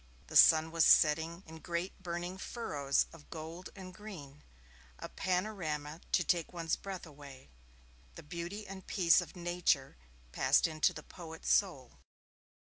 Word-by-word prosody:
The -, -, -10 dB
sun 160 Hz, 0 st, +7 dB
was 165 Hz, -1 st, +3 dB
setting 160 Hz, +4 st, +4 dB
in 160 Hz, 0 st, -11 dB
great 175 Hz, +3 st, -4 dB
burning 175 Hz, +1 st, -4 dB
furrows 145 Hz, -, -1 dB
of 165 Hz, -3 st, -15 dB
gold 165 Hz, +3 st, -8 dB
and 185 Hz, -2 st, -9 dB
green 170 Hz, -9 st, -10 dB, 0.6 s
a -, -, -7 dB
panorama 175 Hz, -5 st, -2 dB
to 175 Hz, -, +4 dB
take 170 Hz, 0 st, 0 dB
one's 165 Hz, -2 st, -1 dB
breath 195 Hz, -3 st, -7 dB
away. 140 Hz, -, -13 dB, 0.6 s
The -, -, -10 dB
beauty 175 Hz, +6 st, -6 dB
and 190 Hz, -2 st, -10 dB
peace 180 Hz, -1 st, +4 dB
of 175 Hz, -, -9 dB
Nature 175 Hz, -, 0 dB, 0.3 s
passed -, -, +3 dB
into 155 Hz, -2 st, +2 dB
the -, -, -9 dB
poet's 160 Hz, -2 st, -6 dB
soul. 145 Hz, -, 0 dB
170 Hz, 140 wpm, -33 LUFS, 155-185 Hz, 0.6 s, sun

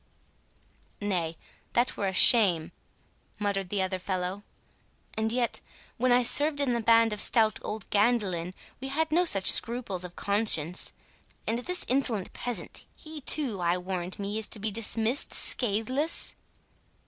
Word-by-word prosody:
"Nay, 175 Hz, -6 st, -3 dB, 0.4 s
that 240 Hz, +2 st, 0 dB
were 200 Hz, -, -3 dB
a -, -, -1 dB
shame," 185 Hz, -5 st, +5 dB, 0.7 s
muttered 200 Hz, -3 st, -3 dB
the 200 Hz, -1 st, -1 dB
other 185 Hz, 0 st, -3 dB
fellow; 185 Hz, +1 st, -4 dB, 0.7 s
"and 220 Hz, 0 st, -2 dB
yet, 240 Hz, -1 st, -1 dB, 0.4 s
when 255 Hz, +1 st, 0 dB
I 245 Hz, +1 st, +4 dB
served 290 Hz, +4 st, +4 dB
in 275 Hz, -4 st, 0 dB
the 235 Hz, -, -2 dB
band 230 Hz, 0 st, +3 dB
of 210 Hz, -, -3 dB
stout 220 Hz, -3 st, +3 dB
old 215 Hz, -1 st, -7 dB
Gandelyn, 200 Hz, -5 st, 0 dB, 0.2 s
we 265 Hz, -, -7 dB
had 310 Hz, +3 st, -1 dB
no 350 Hz, +3 st, +2 dB
such 195 Hz, -, +7 dB
scruples 230 Hz, -6 st, +1 dB
of 180 Hz, -1 st, -9 dB
conscience. 200 Hz, -5 st, 0 dB, 0.5 s
And 230 Hz, +1 st, -1 dB
this 360 Hz, +9 st, -1 dB
insolent 240 Hz, -7 st, -1 dB
peasant,—he 245 Hz, -, -6 dB
too, 245 Hz, -11 st, 0 dB
I 175 Hz, +1 st, 0 dB
warrant 180 Hz, 0 st, -6 dB
me, 205 Hz, +2 st, -4 dB
is 220 Hz, -, +2 dB
to -, -, -3 dB
be 215 Hz, +1 st, -3 dB
dismissed 225 Hz, +4 st, +2 dB
scatheless?" 255 Hz, +7 st, -1 dB
215 Hz, 145 wpm, -27 LUFS, 190-245 Hz, 0.7 s, such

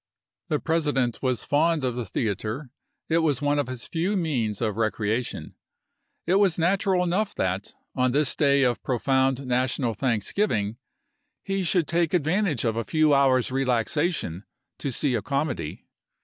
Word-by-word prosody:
The 150 Hz, -, 0 dB
President 145 Hz, -7 st, 0 dB
was 130 Hz, -3 st, 0 dB
fond 155 Hz, +1 st, +2 dB
of 125 Hz, -2 st, -1 dB
the 120 Hz, -3 st, -4 dB
theater; 110 Hz, +7 st, -3 dB, 0.4 s
it 165 Hz, +1 st, +2 dB
was 150 Hz, -6 st, +1 dB
one 145 Hz, 0 st, +1 dB
of 145 Hz, -, -1 dB
his 130 Hz, -2 st, -6 dB
few 180 Hz, +5 st, -1 dB
means 125 Hz, -, -1 dB
of 110 Hz, -4 st, -1 dB
recreation. 110 Hz, +1 st, -2 dB, 0.7 s
It 185 Hz, +3 st, +3 dB
was 195 Hz, -4 st, +4 dB
Api.u,i866. 170 Hz, +2 st, +2 dB
natural 190 Hz, -2 st, +1 dB
enough 190 Hz, +4 st, -1 dB
that, 95 Hz, +2 st, -2 dB, 0.2 s
on 130 Hz, -1 st, +1 dB
this 145 Hz, +1 st, +2 dB
day 140 Hz, -2 st, +3 dB
of 120 Hz, -4 st, +1 dB
profound 130 Hz, +1 st, +1 dB
national 125 Hz, -1 st, 0 dB
thanksgiving, 115 Hz, -, 0 dB, 0.7 s
he 195 Hz, 0 st, -1 dB
should 180 Hz, -2 st, +1 dB
take 170 Hz, +2 st, +1 dB
advantage 170 Hz, -, +1 dB
of 110 Hz, -1 st, +1 dB
a 115 Hz, -, -1 dB
few 155 Hz, +1 st, +2 dB
hours' 130 Hz, -3 st, +3 dB
relaxation 130 Hz, -, 0 dB, 0.4 s
to 140 Hz, -, -2 dB
see 135 Hz, +2 st, 0 dB
a 115 Hz, -, 0 dB
comedy. 140 Hz, -, -3 dB
135 Hz, 155 wpm, -25 LUFS, 120-160 Hz, 0.7 s, was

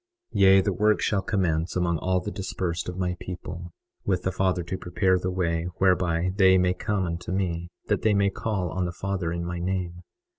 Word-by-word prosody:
21:27 -, -, 0 dB
Yea, 95 Hz, 0 st, +7 dB
the 100 Hz, 0 st, 0 dB
work 105 Hz, +2 st, +3 dB
shall 100 Hz, -2 st, +1 dB
commence 85 Hz, -5 st, 0 dB
among 85 Hz, -2 st, +1 dB
all 90 Hz, +3 st, +1 dB
the 105 Hz, -, -5 dB
dispersed 90 Hz, -3 st, -3 dB
of 90 Hz, -, -6 dB
my 90 Hz, -1 st, -1 dB
people, 90 Hz, -1 st, -7 dB, 0.3 s
with 95 Hz, -3 st, 0 dB
the 95 Hz, -, 0 dB
Father 95 Hz, -2 st, 0 dB
to 85 Hz, +3 st, -4 dB
prepare 95 Hz, +1 st, +1 dB
the 90 Hz, -, -2 dB
way 85 Hz, -3 st, -1 dB
whereby 90 Hz, -2 st, +2 dB
they 95 Hz, -2 st, +6 dB
may 90 Hz, 0 st, +3 dB
come 100 Hz, +1 st, -1 dB
unto 85 Hz, +1 st, -4 dB
me, 85 Hz, -3 st, -1 dB, 0.2 s
that -, -, 0 dB
they 110 Hz, -2 st, +3 dB
may 100 Hz, 0 st, +3 dB
call 95 Hz, -5 st, -2 dB
on 95 Hz, -1 st, -1 dB
the 85 Hz, -, -2 dB
Father 95 Hz, -1 st, -2 dB
in 85 Hz, 0 st, -3 dB
my 85 Hz, 0 st, -4 dB
name. 90 Hz, -1 st, -2 dB
90 Hz, 210 wpm, -26 LUFS, 85-95 Hz, 0.3 s, Yea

